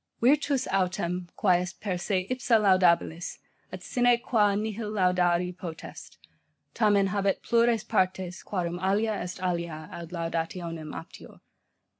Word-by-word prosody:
'Virtus 275 +1 +3
autem, 180 -2 -1
quae 180 -3 +3
est 180 - -6
per 200 -3 -2
se 185 +1 -1
ipsa 250 -2 +3
laudabilis, 180 -4 +2 0.3
et - - -8
sine 245 -2 +3
qua 215 -4 +2
nihil 215 +1 -3
laudari 180 -3 +1
potest, 170 -3 -9 0.6
tamen 205 -3 +3
habet 195 0 0
plures 235 -2 +3
partes, 190 -4 -1
quarum 175 -3 -3
alia 205 +4 +1
est 180 -2 -5
alia 170 -3 -3
ad 170 -1 -8
laudationem 165 -1 -4
aptior. - - -11
185 Hz, 125 wpm, -27 LUFS, 175-215 Hz, 0.6 s, Virtus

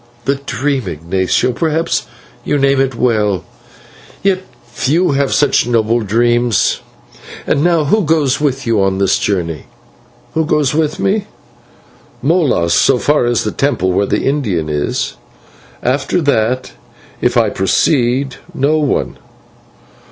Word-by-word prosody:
"The 140 - +2
dream, 140 -3 -2
Ignatio? 90 +8 0
Perhaps 160 +5 -1 0.4
you 145 - 0
name 135 -1 +2
it 135 -2 -1
well, 105 -6 0 0.8
yet 190 -1 +2 0.2
few 150 +8 0
have 140 0 0
such 140 -4 +2
noble 115 -1 +2
dreams. 120 +1 +1 0.7
And 140 - +1
now, 170 -2 +3
who 210 +10 +2
goes 150 -4 +1
with 135 -2 -1
you 115 -3 +1
on 95 0 +1
this 95 0 +2
journey?" 85 -6 -2 0.7
"Who 160 - +1
goes 150 -3 +1
with 155 -1 0
me? 205 +1 0 1.0
Molas, 135 - +2
as 130 -3 +1
far 150 -4 +3
as 120 -1 +1
the 105 - -2
temple 125 -10 0
where 100 +2 +1
the - - -1
Indian 105 - -1
is. 75 -1 -2 0.7
After 135 +7 0
that, 130 -4 0 0.5
if - - +1
I - - +3
proceed, 125 - +1 0.2
no 150 +4 +2
one. 145 -3 -1
130 Hz, 130 wpm, -15 LUFS, 110-150 Hz, 1.0 s, now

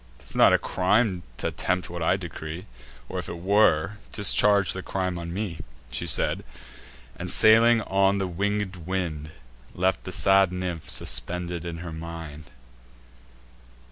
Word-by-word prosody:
'Tis - - -11
not - - +6
a - - +5
crime 95 0 +1 0.2
t' - - -6
attempt 90 0 -2
what 85 0 -7
I 80 - +2
decree; 85 -2 -7 0.4
Or, - - -4
if - - -7
it 85 - -6
were, 100 0 +2
discharge 100 -1 +3
the 95 - -5
crime 90 -2 -3
on 85 0 -6
me." 95 -3 -4 0.3
She - - -4
said, - - +2 0.7
and, 90 +1 -5
sailing 115 +1 +6
on 95 +1 +2
the 95 - -1
winged 100 +1 -2
wind, 85 -5 -3 0.5
Left 95 +1 0
the 95 - -7
sad 95 0 +4
nymph 90 -3 -5
suspended 90 -1 -1
in 85 -1 -5
her 80 - -6
mind. 80 -2 -8
90 Hz, 145 wpm, -25 LUFS, 85-100 Hz, 0.7 s, not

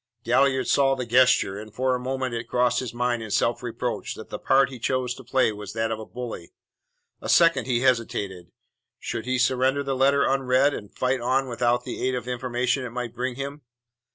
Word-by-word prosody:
Galliard 130 +2 +2
saw 135 -1 +3
the 130 -2 -4
gesture, 125 -4 +3
and 110 0 -10
for 130 +3 0
a 125 - -1
moment 130 0 -3
it 115 0 -4
crossed 125 0 +2
his 125 -3 -4
mind 120 -1 -1
in 110 - -7
self 115 +3 +1
reproach 120 -2 -4
that - - -10
the - - -5
part 135 0 +3
he 130 - -9
chose 125 +1 -1
to 130 - -12
play 130 -1 +2
was 105 -1 -8
that 115 0 -1
of 110 - -3
a 110 - -8
bully. 120 -8 -7 0.7
A - - -5
second 165 -8 +4
he 120 -2 +1
hesitated. 105 -8 -1 0.5
Should 115 - -5
he 130 0 +1
surrender 130 +3 +2
the 135 -1 -2
letter 140 +2 +3
unread, 135 +1 +2
and 105 -6 -7
fight 130 0 -1
on 130 +2 +1
without 120 0 0
the - - -6
aid 130 0 0
of 125 -2 -4
the 125 - -4
information 125 +1 -1
it 125 - -4
might 120 0 -5
bring 125 +1 -3
him? 140 +2 -6
125 Hz, 210 wpm, -25 LUFS, 120-130 Hz, 0.7 s, second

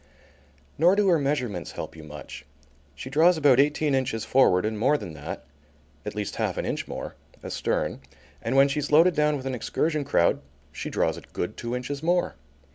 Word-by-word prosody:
Nor 175 +4 +5
do 205 -1 +3
her 170 -3 +4
measurements 125 -11 -2
help - - -7
you 80 - -11
much. 75 -1 -9 0.5
She 75 - -8
draws 165 +5 +5
about 140 -4 +5
eighteen 145 +1 +2
inches 130 -4 -1
forward, 105 -8 +4
and 110 -1 -2
more 135 +6 +3
than 90 - -8
that, 70 -3 -7 0.6
at 105 - -4
least 105 -2 -4
half - - -1
an - - -2
inch - - -3
more, - - -6 0.3
astern, - - -2 0.4
and 115 +3 -2
when 135 +1 +6
she's 145 +1 -2
loaded 165 +4 +6
down 150 -1 +2
with 130 - -8
an 135 - -2
excursion 150 +5 -1
crowd 85 -10 +2 0.3
she - - -5
draws - - 0
a - - -8
good 95 +5 -5
two 120 +1 -4
inches 135 +3 -4
more. 175 +2 +1
135 Hz, 190 wpm, -26 LUFS, 110-150 Hz, 0.6 s, when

